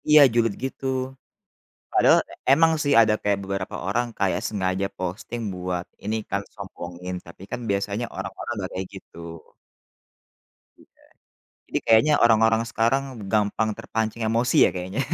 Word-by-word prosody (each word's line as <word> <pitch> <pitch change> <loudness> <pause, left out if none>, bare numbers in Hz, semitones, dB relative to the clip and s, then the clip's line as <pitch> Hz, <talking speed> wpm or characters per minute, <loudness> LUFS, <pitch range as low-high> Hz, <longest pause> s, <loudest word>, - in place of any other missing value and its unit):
Iya 150 0 +9
julid 115 -2 +2
gitu. 135 0 -6 1.1
Padahal - - +6 0.3
emang 160 +4 +6
sih 145 - +2
ada 110 -1 +4
kayak 100 -1 +1
beberapa 95 -1 -4
orang 120 +5 0
kayak 95 -2 +1
sengaja 95 -2 -1
posting 95 +6 -4
buat 90 -1 -3 0.2
ini 105 +2 -1
kan 100 - 0
sombongin, 90 -2 -7
tapi 85 +2 -13
kan - - -3
biasanya 100 +3 -1
orang-orang 95 +5 -5
nggak 95 -4 -4
kayak 95 0 -4
gitu. - - -13 1.6
Iya, - - -24 0.7
jadi - - -1
kayaknya 115 +7 +5
orang-orang 110 0 +4
sekarang 115 +5 +2 0.3
gampang 110 +1 +1
terpancing 110 +1 -3
emosi 115 +3 +1
ya - - +1
kayaknya. 95 +6 -3
105 Hz, 135 wpm, -24 LUFS, 95-115 Hz, 1.6 s, Iya